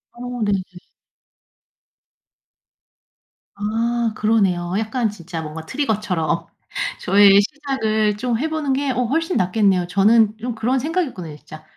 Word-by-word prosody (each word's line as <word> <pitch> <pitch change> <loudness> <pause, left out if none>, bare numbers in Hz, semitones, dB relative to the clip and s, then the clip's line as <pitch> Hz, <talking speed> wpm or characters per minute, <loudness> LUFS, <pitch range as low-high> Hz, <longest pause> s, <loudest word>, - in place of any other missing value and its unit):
어 245 0 -6
네네. 205 -2 +1 3.0
아, 225 +2 -1
그러네요. 195 -6 +1
약간 225 +1 -1
진짜 170 -4 -7
뭔가 160 +1 -7
트리거처럼 210 - -1 0.5
저의 200 +1 +6
시작을 220 -5 -1
좀 240 +1 -1
해 315 +4 -1
보는 310 -3 -1
게 280 +1 -1
어 250 0 0
훨씬 325 +8 0
낫겠네요. 185 -1 +2
저는 215 +4 +3
좀 240 +1 -4
그런 245 +4 0
생각이었거든요, 260 - -3
진짜. 155 +1 -13
220 Hz, 255 characters per minute, -21 LUFS, 195-250 Hz, 3.0 s, 저의